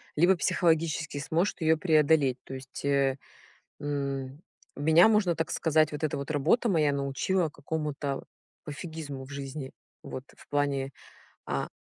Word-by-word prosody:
либо 175 Hz, +5 st, +5 dB
психологически 160 Hz, -2 st, +1 dB
сможешь 165 Hz, +7 st, 0 dB
ты 165 Hz, -, -4 dB
ее 160 Hz, 0 st, +5 dB
преодолеть. 150 Hz, -5 st, +3 dB
То 135 Hz, -, -7 dB
есть, 130 Hz, +1 st, -9 dB
э, 140 Hz, -1 st, +2 dB, 0.6 s
м, 140 Hz, -1 st, -3 dB, 0.4 s
меня, 160 Hz, +7 st, +6 dB
можно 205 Hz, -6 st, +3 dB
так 160 Hz, -, -2 dB
сказать, 155 Hz, -1 st, +2 dB
вот 150 Hz, +2 st, -3 dB
эта 150 Hz, -, 0 dB
вот 140 Hz, +1 st, -5 dB
работа 160 Hz, -, +2 dB
моя 155 Hz, -6 st, +3 dB
научила 140 Hz, +6 st, 0 dB
какому-то 150 Hz, -3 st, -3 dB, 0.4 s
пофигизму 150 Hz, -3 st, -6 dB
в 135 Hz, -, -14 dB
жизни. 140 Hz, -1 st, -6 dB, 0.3 s
Вот 130 Hz, -, -6 dB
в -, -, -18 dB
плане, 140 Hz, -2 st, 0 dB, 0.6 s
а, -, -, -2 dB
150 Hz, 140 wpm, -29 LUFS, 140-160 Hz, 0.6 s, меня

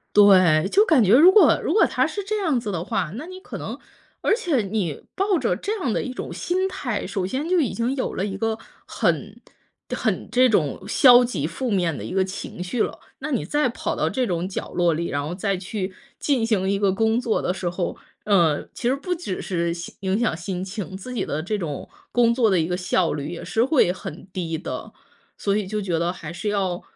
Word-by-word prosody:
对， 185 Hz, -5 st, +6 dB
就 415 Hz, -, +6 dB
感 280 Hz, -, +4 dB
觉 200 Hz, +5 st, +5 dB
如 335 Hz, +7 st, +9 dB
果 380 Hz, -6 st, +6 dB
如 -, -, 0 dB
果 415 Hz, +2 st, +5 dB
它 255 Hz, +2 st, +1 dB
是 395 Hz, +5 st, -4 dB
这 425 Hz, +1 st, -1 dB
样 315 Hz, -10 st, +1 dB
子 210 Hz, -3 st, -4 dB
的 170 Hz, -1 st, -3 dB
话， 155 Hz, -, -1 dB
那 300 Hz, +7 st, -6 dB
你 370 Hz, 0 st, -9 dB
可 -, -, -8 dB
能 -, -, -6 dB, 0.4 s
而 -, -, +3 dB
且 335 Hz, -, 0 dB
你 195 Hz, -6 st, -2 dB
抱 390 Hz, -2 st, +1 dB
着 230 Hz, -8 st, +1 dB
这 415 Hz, -, -3 dB
样 255 Hz, -, -1 dB
的 -, -, 0 dB
一 255 Hz, -, -4 dB
种 -, -, -6 dB
心 370 Hz, +2 st, -1 dB
态， 270 Hz, -, -3 dB
首 185 Hz, -2 st, -2 dB
先 275 Hz, -, -3 dB
就 365 Hz, -2 st, +3 dB
已 270 Hz, -, 0 dB
经 235 Hz, +3 st, -1 dB
有 265 Hz, -, -2 dB
了 190 Hz, -, -1 dB
一 195 Hz, -1 st, -3 dB
个 225 Hz, +1 st, -1 dB, 0.3 s
很 -, -, -1 dB, 0.5 s
很 215 Hz, -4 st, -1 dB
这 250 Hz, +2 st, +5 dB
种 170 Hz, -, +1 dB
消 245 Hz, -1 st, +7 dB
极 245 Hz, -, -2 dB
负 255 Hz, -3 st, -3 dB
面 175 Hz, -6 st, +1 dB
的 -, -, -7 dB
一 -, -, -6 dB
个 190 Hz, -1 st, +3 dB
情 185 Hz, -1 st, -6 dB
绪 220 Hz, +5 st, 0 dB
了。 -, -, -3 dB, 0.2 s
那 300 Hz, +3 st, -5 dB
你 255 Hz, -, 0 dB
再 295 Hz, -3 st, +1 dB
跑 240 Hz, -, -3 dB
到 -, -, 0 dB
这 255 Hz, -2 st, -1 dB
种 175 Hz, -1 st, -1 dB
角 195 Hz, -, -5 dB
落 175 Hz, -2 st, +2 dB
里， 170 Hz, +2 st, -2 dB
然 145 Hz, 0 st, -2 dB
后 175 Hz, -, -4 dB
再 195 Hz, 0 st, -1 dB
去 190 Hz, 0 st, -4 dB, 0.2 s
进 270 Hz, -6 st, +1 dB
行 200 Hz, -4 st, +1 dB
一 200 Hz, -, +1 dB
个 200 Hz, -1 st, +3 dB
工 225 Hz, +4 st, +1 dB
作 235 Hz, -3 st, 0 dB
的 180 Hz, -, 0 dB
时 185 Hz, -1 st, -3 dB
候， 175 Hz, 0 st, -3 dB, 0.3 s
呃， 170 Hz, -8 st, +3 dB
其 240 Hz, -, -2 dB
实 265 Hz, -, +2 dB
不 360 Hz, +6 st, -2 dB
只 325 Hz, -, -5 dB
是 170 Hz, -2 st, -1 dB
心 170 Hz, 0 st, -8 dB
影 195 Hz, +1 st, 0 dB
响 235 Hz, -8 st, +1 dB
心 180 Hz, +1 st, -4 dB
情， 195 Hz, -1 st, -6 dB
自 250 Hz, +6 st, -8 dB
己 240 Hz, -, -1 dB
的 155 Hz, +2 st, -2 dB
这 210 Hz, +4 st, -2 dB
种 150 Hz, -6 st, -5 dB, 0.2 s
工 235 Hz, -1 st, +4 dB
作 235 Hz, -2 st, +3 dB
的 185 Hz, -, +3 dB
一 160 Hz, -, +1 dB
个 180 Hz, +1 st, -1 dB
效 180 Hz, -1 st, +1 dB
率 145 Hz, -1 st, -4 dB
也 175 Hz, -, -6 dB
是 200 Hz, +6 st, +1 dB
会 255 Hz, -, +3 dB
很 185 Hz, -2 st, -8 dB
低 165 Hz, -3 st, -3 dB
的。 160 Hz, -, -6 dB, 0.5 s
所 200 Hz, 0 st, +1 dB
以 205 Hz, -3 st, -2 dB
就 215 Hz, +1 st, -2 dB
觉 175 Hz, -4 st, -1 dB
得 170 Hz, +1 st, 0 dB
还 165 Hz, -3 st, -8 dB
是 210 Hz, +4 st, -4 dB
要 190 Hz, -3 st, -1 dB
205 Hz, 255 characters per minute, -23 LUFS, 180-255 Hz, 0.5 s, 如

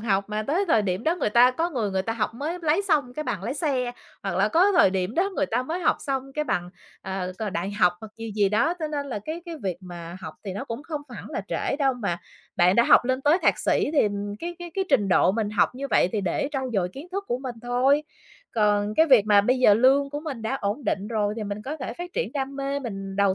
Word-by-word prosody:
học 200 Hz, -3 st, +1 dB
mà 210 Hz, 0 st, -2 dB
tới 325 Hz, -, 0 dB
thời 225 Hz, -9 st, +4 dB
điểm 190 Hz, +1 st, -2 dB
đó 325 Hz, -, +2 dB
người 285 Hz, -, 0 dB
ta 240 Hz, +3 st, +6 dB
có 330 Hz, +7 st, -1 dB
người 230 Hz, -9 st, -1 dB
người 190 Hz, -1 st, 0 dB
ta 225 Hz, +3 st, -2 dB
học 225 Hz, -1 st, -2 dB
mới 310 Hz, +8 st, -3 dB
lấy 320 Hz, +5 st, +2 dB
xong 300 Hz, -10 st, +1 dB
cái 305 Hz, -, -3 dB
bằng 200 Hz, -, -3 dB
lái 235 Hz, +6 st, -3 dB
xe, 265 Hz, -6 st, -1 dB, 0.3 s
hoặc 195 Hz, -3 st, -2 dB
là 200 Hz, +2 st, +3 dB
có 365 Hz, -, +4 dB
thời 350 Hz, -, +5 dB
điểm 190 Hz, +3 st, -2 dB
đó 380 Hz, +4 st, +1 dB
người -, -, +1 dB
ta 245 Hz, +3 st, 0 dB
mới 325 Hz, +7 st, -3 dB
học -, -, +2 dB
xong 270 Hz, -1 st, -3 dB
cái 300 Hz, +2 st, -1 dB
bằng, 175 Hz, -10 st, -2 dB, 0.3 s
ờ, 190 Hz, -1 st, -4 dB
c 205 Hz, +1 st, -4 dB
đại 175 Hz, +3 st, -2 dB
học 180 Hz, -3 st, +3 dB
hoặc 220 Hz, -1 st, -10 dB
gì 225 Hz, 0 st, -6 dB
gì 205 Hz, -2 st, +4 dB
đó. 235 Hz, -, +2 dB
Cho 315 Hz, -2 st, -2 dB
nên 290 Hz, -2 st, -3 dB
là 250 Hz, -6 st, -3 dB
cái 315 Hz, +11 st, -6 dB
cái 340 Hz, -, -5 dB
việc 185 Hz, -3 st, -2 dB
mà 175 Hz, -2 st, -8 dB
học -, -, -7 dB
thì 195 Hz, -, -4 dB
nó 200 Hz, +8 st, -5 dB
cũng 230 Hz, +1 st, -6 dB
không 305 Hz, -2 st, -5 dB
hẳn 240 Hz, -, -9 dB
là -, -, -2 dB
trễ -, -, -1 dB
đâu 275 Hz, -2 st, +2 dB
mà 200 Hz, -8 st, -2 dB, 0.4 s
bạn 180 Hz, +1 st, +4 dB
đã 235 Hz, -, +6 dB
học -, -, +6 dB
lên 260 Hz, +1 st, 0 dB
tới 295 Hz, +5 st, +4 dB
thạc -, -, +3 dB
sĩ -, -, +1 dB
thì 285 Hz, -9 st, +4 dB, 0.3 s
cái 345 Hz, +5 st, -5 dB
cái 350 Hz, -1 st, -7 dB
cái 385 Hz, -, 0 dB
trình 220 Hz, -8 st, +3 dB
độ 185 Hz, -, +4 dB
mình 215 Hz, -1 st, -1 dB
học 215 Hz, -, +2 dB
như 275 Hz, +2 st, -4 dB
vậy -, -, +4 dB
thì 215 Hz, -, 0 dB
để 195 Hz, +8 st, -1 dB
trau 265 Hz, -2 st, -2 dB
dồi 190 Hz, -4 st, +1 dB
kiến 275 Hz, -, -10 dB
thức 400 Hz, +1 st, -3 dB
của 240 Hz, -, -1 dB
mình 255 Hz, -2 st, -6 dB
thôi. 255 Hz, +4 st, +2 dB, 0.5 s
Còn 210 Hz, -1 st, +2 dB
cái 320 Hz, -, +5 dB
việc 250 Hz, -8 st, +6 dB
mà 205 Hz, -1 st, +6 dB
bây 250 Hz, +6 st, +1 dB
giờ 210 Hz, -5 st, +6 dB
lương 270 Hz, +4 st, +4 dB
của 290 Hz, +1 st, -4 dB
mình 285 Hz, -7 st, -6 dB
đã 225 Hz, +4 st, -1 dB
ổn 205 Hz, +7 st, -2 dB
định 200 Hz, -1 st, -1 dB
rồi 210 Hz, -2 st, 0 dB
thì 220 Hz, -, -3 dB
mình 205 Hz, +1 st, -5 dB
có 295 Hz, +6 st, -5 dB
thể 260 Hz, -, -5 dB
phát 350 Hz, 0 st, -8 dB
triển -, -, -2 dB
đam 275 Hz, -1 st, -3 dB
mê, 275 Hz, 0 st, -2 dB
mình 195 Hz, -7 st, -6 dB
đầu 200 Hz, -1 st, +3 dB
240 Hz, 275 wpm, -25 LUFS, 205-290 Hz, 0.5 s, ta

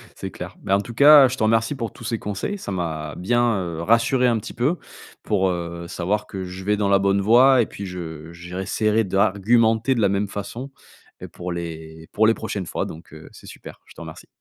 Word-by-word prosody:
C'est -, -, -7 dB
clair. -, -, -8 dB
Bah, 95 Hz, -, +1 dB
en -, -, -1 dB
tout 115 Hz, -, -9 dB
cas, 145 Hz, +2 st, +8 dB
je 130 Hz, +1 st, -4 dB
te -, -, -1 dB
remercie 115 Hz, +4 st, +2 dB
pour 115 Hz, -4 st, -4 dB
tous -, -, -13 dB
ces 115 Hz, 0 st, -2 dB
conseils, 105 Hz, -, -4 dB
ça 100 Hz, -, -7 dB
m'a 80 Hz, -4 st, -4 dB
bien, 120 Hz, +3 st, +1 dB
heu, 85 Hz, -2 st, -5 dB
rassuré 115 Hz, +6 st, +3 dB
un 115 Hz, -2 st, +2 dB
petit 105 Hz, -, -9 dB
peu 145 Hz, +9 st, 0 dB, 0.5 s
pour, 95 Hz, -3 st, +1 dB
heu, 85 Hz, -1 st, -5 dB
savoir 100 Hz, +5 st, -2 dB
que 95 Hz, -2 st, -6 dB
je 90 Hz, +1 st, -8 dB
vais 105 Hz, +2 st, +1 dB
dans 100 Hz, -1 st, 0 dB
la 100 Hz, -1 st, +4 dB
bonne 100 Hz, 0 st, +2 dB
voie 125 Hz, +4 st, +5 dB
et -, -, +1 dB
puis 100 Hz, -, -8 dB
je 80 Hz, -3 st, -7 dB
je 85 Hz, +1 st, -10 dB
réessaierai 105 Hz, +4 st, 0 dB
d'argumenter 110 Hz, +5 st, +2 dB
de 115 Hz, -, 0 dB
la 100 Hz, -, +3 dB
même 100 Hz, +1 st, 0 dB
façon, 115 Hz, +7 st, -7 dB, 0.5 s
et -, -, -7 dB
pour 90 Hz, 0 st, -7 dB
les 80 Hz, -2 st, -7 dB
pour 110 Hz, +1 st, +3 dB
les 115 Hz, -, +5 dB
prochaines 105 Hz, -4 st, -5 dB
fois. -, -, -3 dB
Donc, 80 Hz, 0 st, -11 dB
heu, 80 Hz, 0 st, -12 dB
c'est -, -, -15 dB
super, -, -, -12 dB
je -, -, -17 dB
te -, -, -12 dB
remercie. -, -, -10 dB
100 Hz, 230 wpm, -22 LUFS, 90-115 Hz, 0.5 s, cas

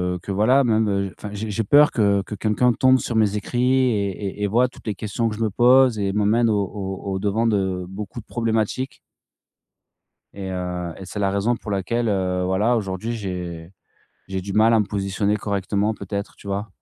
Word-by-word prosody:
heu, -, -, -6 dB
que 100 Hz, -, -6 dB
voilà 115 Hz, +8 st, +4 dB
même 105 Hz, -5 st, +1 dB
enfin 105 Hz, -, -7 dB
j'ai 105 Hz, +2 st, -4 dB
j'ai 115 Hz, +2 st, -1 dB
peur 145 Hz, +8 st, +6 dB
que 100 Hz, -3 st, +2 dB
que 105 Hz, -, -7 dB
quelqu'un 110 Hz, +4 st, +2 dB
tombe 130 Hz, +2 st, +4 dB
sur 120 Hz, -, -4 dB
mes 105 Hz, -2 st, +2 dB
écrits 120 Hz, +4 st, -2 dB, 0.3 s
et 100 Hz, -4 st, 0 dB, 0.3 s
et -, -, -2 dB
et -, -, +2 dB
voit 120 Hz, +5 st, +3 dB
toutes 125 Hz, -, -16 dB
les 105 Hz, -, -1 dB
questions 110 Hz, +3 st, -2 dB
que 110 Hz, -, -3 dB
je 110 Hz, -, -7 dB
me 110 Hz, -, +1 dB
pose 125 Hz, +2 st, +5 dB
et 100 Hz, -1 st, -1 dB
m'emmène 105 Hz, +3 st, +2 dB
au 110 Hz, -, +2 dB
au 95 Hz, 0 st, -5 dB
au 95 Hz, -, -2 dB
devant 105 Hz, +3 st, 0 dB
de 95 Hz, -4 st, 0 dB
beaucoup 95 Hz, +3 st, -7 dB
de -, -, -26 dB
problématiques 115 Hz, +3 st, -2 dB, 1.4 s
et 95 Hz, -1 st, -6 dB
heu 90 Hz, -2 st, -4 dB
et 95 Hz, -, -9 dB
c'est 100 Hz, +3 st, -5 dB
la 100 Hz, -1 st, +2 dB
raison 100 Hz, +5 st, +1 dB
pour 110 Hz, -, -8 dB
laquelle 100 Hz, +5 st, -1 dB, 0.4 s
voilà 105 Hz, +6 st, +2 dB
aujourd'hui 105 Hz, +1 st, -3 dB
j'ai 90 Hz, -6 st, -5 dB, 0.6 s
j'ai 95 Hz, -1 st, -3 dB
du 95 Hz, +1 st, -6 dB
mal 110 Hz, +2 st, +5 dB
à 110 Hz, -, +4 dB
me 105 Hz, -, -1 dB
positionner 100 Hz, +1 st, -1 dB
correctement 100 Hz, +1 st, -1 dB
peut-être, 100 Hz, -1 st, -5 dB
tu -, -, -15 dB
vois? 100 Hz, +2 st, -3 dB
105 Hz, 205 wpm, -22 LUFS, 95-115 Hz, 1.4 s, peur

